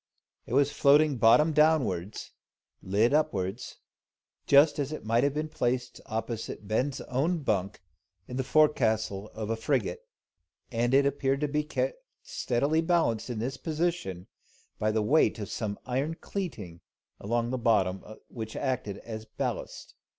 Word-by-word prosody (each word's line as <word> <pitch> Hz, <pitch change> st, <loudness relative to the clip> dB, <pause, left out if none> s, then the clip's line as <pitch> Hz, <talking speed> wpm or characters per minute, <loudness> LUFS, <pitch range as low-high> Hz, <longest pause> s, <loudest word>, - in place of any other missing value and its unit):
It 120 Hz, -, -5 dB
was 140 Hz, +1 st, +4 dB
floating 145 Hz, 0 st, +4 dB
bottom 150 Hz, +8 st, +5 dB
downwards, 130 Hz, -, +1 dB, 0.5 s
and 95 Hz, -, -11 dB
lid 110 Hz, +6 st, +3 dB
upwards, 105 Hz, -7 st, -1 dB, 0.7 s
just 145 Hz, +2 st, +5 dB
as 145 Hz, 0 st, -2 dB
it 155 Hz, -, -6 dB
might 115 Hz, +3 st, +2 dB
have 140 Hz, 0 st, +1 dB
been 155 Hz, +1 st, -1 dB
placed 125 Hz, -5 st, -2 dB
opposite 110 Hz, -2 st, -4 dB
Ben's 130 Hz, +6 st, -1 dB
own 150 Hz, +6 st, -1 dB
bunk 100 Hz, -5 st, -1 dB, 0.4 s
in 125 Hz, -, -7 dB
the 130 Hz, -, -1 dB
forecastle 110 Hz, -9 st, +2 dB
of 110 Hz, 0 st, -3 dB
a -, -, +1 dB
frigate, 115 Hz, -5 st, -1 dB, 0.7 s
and 120 Hz, +2 st, +1 dB
it 140 Hz, 0 st, +5 dB
appeared 140 Hz, 0 st, 0 dB
to 150 Hz, -, +1 dB
be 150 Hz, +1 st, 0 dB
kept -, -, -2 dB, 0.2 s
steadily 155 Hz, -, 0 dB
balanced 160 Hz, -10 st, +1 dB
in 120 Hz, -, -3 dB
this 125 Hz, +5 st, -3 dB
position 160 Hz, -, -2 dB, 0.5 s
by 110 Hz, -, +1 dB
the 110 Hz, 0 st, +1 dB
weight 145 Hz, +6 st, +3 dB
of 105 Hz, -3 st, -6 dB
some 105 Hz, -3 st, -3 dB
iron 135 Hz, +6 st, -1 dB
cleeting 110 Hz, -, -6 dB, 0.4 s
along 120 Hz, +3 st, -1 dB
the 130 Hz, -, -2 dB
bottom, 95 Hz, -5 st, +2 dB, 0.2 s
which 110 Hz, -2 st, -7 dB
acted 125 Hz, -7 st, -2 dB
as 110 Hz, -1 st, -6 dB
ballast. -, -, -5 dB
125 Hz, 150 wpm, -28 LUFS, 110-150 Hz, 0.7 s, bottom